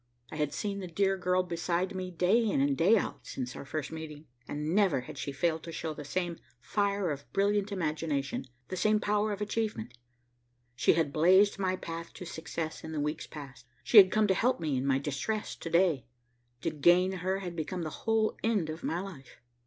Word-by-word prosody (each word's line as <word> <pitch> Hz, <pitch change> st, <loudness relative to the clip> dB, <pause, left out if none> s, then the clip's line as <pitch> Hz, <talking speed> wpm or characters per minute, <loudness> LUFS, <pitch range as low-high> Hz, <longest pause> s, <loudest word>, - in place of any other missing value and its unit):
I 155 Hz, -, -6 dB
had 150 Hz, -2 st, 0 dB
seen 200 Hz, -1 st, -3 dB
the 185 Hz, -, -5 dB
dear 195 Hz, +3 st, +1 dB
girl 185 Hz, -1 st, +1 dB
beside 175 Hz, +2 st, -1 dB
me 185 Hz, -1 st, -4 dB
day 180 Hz, +7 st, +3 dB
in 210 Hz, -10 st, +1 dB
and 140 Hz, 0 st, +2 dB
day 190 Hz, +11 st, +5 dB
out -, -, -2 dB
since 125 Hz, -2 st, -5 dB
our -, -, -7 dB
first 150 Hz, +1 st, -4 dB
meeting, 160 Hz, -1 st, -7 dB, 0.2 s
and 150 Hz, +2 st, -3 dB
never 190 Hz, -10 st, +3 dB
had 125 Hz, -, -9 dB
she 140 Hz, -, -4 dB
failed 160 Hz, +3 st, 0 dB
to 165 Hz, -, -8 dB
show 160 Hz, -1 st, -4 dB
the 150 Hz, -, -8 dB
same 175 Hz, +3 st, -2 dB, 0.2 s
fire 200 Hz, -, 0 dB
of 140 Hz, -1 st, -7 dB
brilliant 205 Hz, +1 st, +1 dB
imagination, 155 Hz, -7 st, -2 dB, 0.2 s
the 185 Hz, -, -3 dB
same 215 Hz, +3 st, +3 dB
power 210 Hz, +1 st, +1 dB
of 205 Hz, 0 st, -4 dB
achievement. 210 Hz, -, -2 dB, 0.8 s
She -, -, +4 dB
had 160 Hz, -4 st, 0 dB
blazed 190 Hz, +6 st, +5 dB
my 185 Hz, -1 st, +1 dB
path 165 Hz, -2 st, -7 dB
to 180 Hz, -, -7 dB
success 160 Hz, -1 st, -5 dB
in 160 Hz, -, -6 dB
the 155 Hz, -, -2 dB
weeks 150 Hz, +1 st, -2 dB
past. 140 Hz, -4 st, -10 dB, 0.2 s
She 230 Hz, -, +4 dB
had 190 Hz, -2 st, +10 dB
come 215 Hz, 0 st, +3 dB
to 195 Hz, -, +3 dB
help 240 Hz, +4 st, +1 dB
me 155 Hz, -4 st, -1 dB
in 130 Hz, +2 st, -1 dB
my 135 Hz, -1 st, +3 dB
distress 150 Hz, +10 st, -3 dB
to 165 Hz, -, -6 dB
day. 170 Hz, -8 st, +2 dB, 0.5 s
To 165 Hz, -, -1 dB
gain 175 Hz, +5 st, +4 dB
her 190 Hz, +1 st, -1 dB
had 175 Hz, -2 st, -5 dB
become 170 Hz, +2 st, -3 dB
the 155 Hz, -, -4 dB
whole 225 Hz, -1 st, +1 dB
end 205 Hz, -8 st, +1 dB
of 160 Hz, -, -8 dB
my 170 Hz, -, -1 dB
life. 165 Hz, -10 st, -10 dB
170 Hz, 210 wpm, -30 LUFS, 150-195 Hz, 0.8 s, had